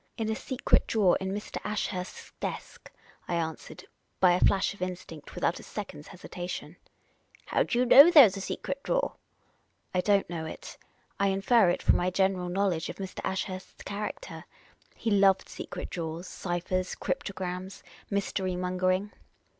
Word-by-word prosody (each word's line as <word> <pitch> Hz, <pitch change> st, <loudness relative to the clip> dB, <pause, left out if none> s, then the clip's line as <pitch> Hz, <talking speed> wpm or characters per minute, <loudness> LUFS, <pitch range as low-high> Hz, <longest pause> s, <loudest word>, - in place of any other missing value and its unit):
" -, -, -43 dB
In 220 Hz, -2 st, -1 dB
a -, -, 0 dB
secret 260 Hz, +3 st, +1 dB
drawer 205 Hz, -5 st, +3 dB
in 190 Hz, 0 st, -2 dB
Mr. 205 Hz, +2 st, -5 dB
Ashurst's 205 Hz, -3 st, -4 dB
desk," -, -, -6 dB, 0.4 s
I 175 Hz, -, -1 dB
answered, 160 Hz, -2 st, -4 dB, 0.3 s
by 185 Hz, -2 st, +6 dB
a 175 Hz, -, +3 dB
flash 195 Hz, +1 st, +3 dB
of 200 Hz, -, -16 dB
instinct, 180 Hz, -4 st, -6 dB
without 170 Hz, -, 0 dB
a -, -, -11 dB
second's 150 Hz, -8 st, -7 dB
hesitation. 180 Hz, -1 st, -7 dB, 0.3 s
" -, -, -31 dB
How -, -, +1 dB
do 235 Hz, -, 0 dB
you 250 Hz, -, +3 dB
know 280 Hz, +6 st, +10 dB
there 295 Hz, -8 st, +10 dB
's 195 Hz, -, -4 dB
a 195 Hz, -, -5 dB
secret 275 Hz, +7 st, -4 dB
drawer? -, -, 0 dB, 0.3 s
" -, -, -40 dB
" -, -, -44 dB
I 180 Hz, -, +2 dB
don't 200 Hz, 0 st, +2 dB
know 165 Hz, -2 st, -4 dB
it. -, -, -9 dB, 0.4 s
I 200 Hz, -, +3 dB
infer 195 Hz, +1 st, +4 dB
it 175 Hz, -, -1 dB
from -, -, +5 dB
my 180 Hz, -, +1 dB
general 185 Hz, -1 st, +1 dB
knowledge 180 Hz, -3 st, 0 dB
of -, -, -5 dB
Mr. 190 Hz, -1 st, -7 dB
Ashurst's 190 Hz, 0 st, -4 dB
character. 210 Hz, -, -6 dB, 0.5 s
He 225 Hz, -, -2 dB
loved 195 Hz, -1 st, +4 dB
secret -, -, -7 dB
drawers, 165 Hz, 0 st, -4 dB
ciphers, 185 Hz, 0 st, -3 dB
cryptograms, 185 Hz, 0 st, -4 dB, 0.3 s
mystery 190 Hz, -2 st, -1 dB
mongering." 185 Hz, +2 st, 0 dB
190 Hz, 170 wpm, -29 LUFS, 180-205 Hz, 0.5 s, know